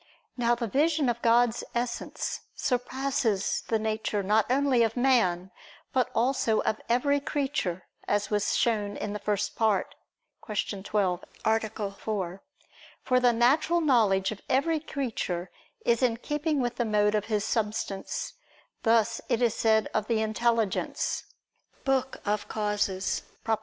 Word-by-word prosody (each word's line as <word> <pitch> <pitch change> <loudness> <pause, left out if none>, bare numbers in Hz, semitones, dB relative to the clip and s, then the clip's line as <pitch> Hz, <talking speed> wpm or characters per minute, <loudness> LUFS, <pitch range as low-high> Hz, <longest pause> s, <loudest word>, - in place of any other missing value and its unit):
Now 240 -1 +2
the 235 0 -3
vision 295 +4 +2
of 235 0 -2
God's 235 0 +3
Essence 240 0 -3 0.2
surpasses 250 -4 0
the 225 - +2
nature 215 -1 -1
not 210 +2 +3
only 270 -2 +3
of 225 +1 +1
man, 190 -9 +2 0.4
but 255 -2 +2
also 235 -2 +2
of 215 - -1
every 280 +4 +3
creature, 270 - -2 0.2
as 205 +1 0
was 205 -1 +1
shown 210 -3 0
in 205 - -4
the 210 - -4
First 205 0 -1
Part 215 -4 +1 0.5
(Q. 205 -2 -3
12, 190 -3 0 0.2
A. 220 -2 0
4). 195 -3 -4 0.6
For 255 -1 +3
the 250 -1 +4
natural 275 +9 +3
knowledge 220 - +3
of 210 - -7
every 315 +5 +2
creature 225 - -3 0.3
is 235 +1 +3
in 240 -3 +2
keeping 295 +3 -1
with 240 -1 -2
the 240 - +1
mode 210 -2 +2
of 210 -1 0
his 215 -2 -1
substance: 210 -3 -2 0.5
thus 230 -1 +2
it 230 - +2
is 240 -3 +2
said 220 -1 +2
of 215 -1 0
the 230 -2 +1
intelligence 220 -1 0 0.6
(De 270 -1 +3 0.5
Causis; 205 -3 -1 0.2
Prop. 220 -1 0
225 Hz, 140 wpm, -28 LUFS, 210-250 Hz, 0.6 s, the